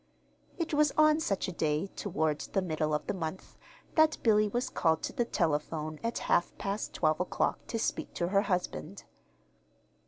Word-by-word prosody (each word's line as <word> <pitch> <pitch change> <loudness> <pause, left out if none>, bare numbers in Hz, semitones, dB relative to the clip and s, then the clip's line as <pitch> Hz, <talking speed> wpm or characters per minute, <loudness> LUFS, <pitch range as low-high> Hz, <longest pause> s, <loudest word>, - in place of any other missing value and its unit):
It 335 -3 -2
was 295 -1 +4
on 310 0 +6
such 200 -11 -1
a - - -3
day, 155 -1 0
toward 160 -6 -1
the 195 - -1
middle 155 -3 -1
of 150 - -1
the - - -1
month, 180 -1 -5 0.4
that 315 -1 +4
Billy 215 -2 +4
was 240 +4 -1
called 160 -1 +1
to - - -3
the 240 - 0
telephone 155 -4 -1
at 230 +1 -1
half 175 - +1
past 200 +2 -3
twelve 155 -1 +2
o'clock 180 - 0
to 230 - -2
speak 225 - -2
to 175 - -1
her 200 +1 +4
husband. 180 - -3
185 Hz, 175 wpm, -31 LUFS, 155-230 Hz, 0.4 s, on